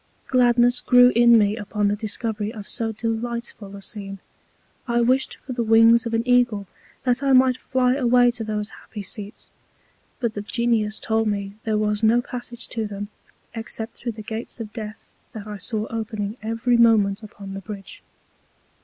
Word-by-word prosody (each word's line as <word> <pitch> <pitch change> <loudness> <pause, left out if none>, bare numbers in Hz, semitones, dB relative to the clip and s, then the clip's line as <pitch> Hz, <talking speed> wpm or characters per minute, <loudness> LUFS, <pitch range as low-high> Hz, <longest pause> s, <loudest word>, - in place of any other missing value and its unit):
Gladness 245 -1 +4
grew 245 0 +6
in 235 0 +7
me 205 -1 +3
upon 210 -1 -1
the 205 - +1
Discovery 215 0 -3
of 210 -3 -9
so 225 -1 -1
delightful 225 -2 -4
a 200 - -9
Scene. 195 -2 -5 0.7
I 240 0 +2
wished 255 +3 +1
for 260 - -5
the 240 - -2
Wings 225 +1 +5
of 230 - -1
an 230 +2 -1
Eagle, 245 -5 +3 0.4
that 250 0 +1
I 275 -1 +2
might 255 -1 +5
fly 255 -1 +1
away 245 -2 +4
to 235 -1 -5
those 210 -1 -2
happy 210 - -9
Seats; 205 +2 -6 0.7
but 235 -3 -1
the 205 - -4
Genius 220 -1 0
told 225 0 0
me 200 -1 -2
there 215 -1 +1
was 210 0 0
no 225 +2 +4
Passage 245 -1 -6
to 225 -2 -2
them, 205 0 -6 0.4
except 225 0 -5
through 240 -1 -5
the 215 0 -9
Gates 225 +3 -5
of 215 -2 -7
Death 215 -2 -8 0.3
that 215 -2 -7
I 210 -1 -6
saw 215 +1 -2
opening 215 -2 -3
every 230 +2 +1
Moment 220 -3 +4
upon 200 -2 -10
the 195 - -6
Bridge. 200 -1 -9
225 Hz, 175 wpm, -23 LUFS, 210-240 Hz, 0.7 s, in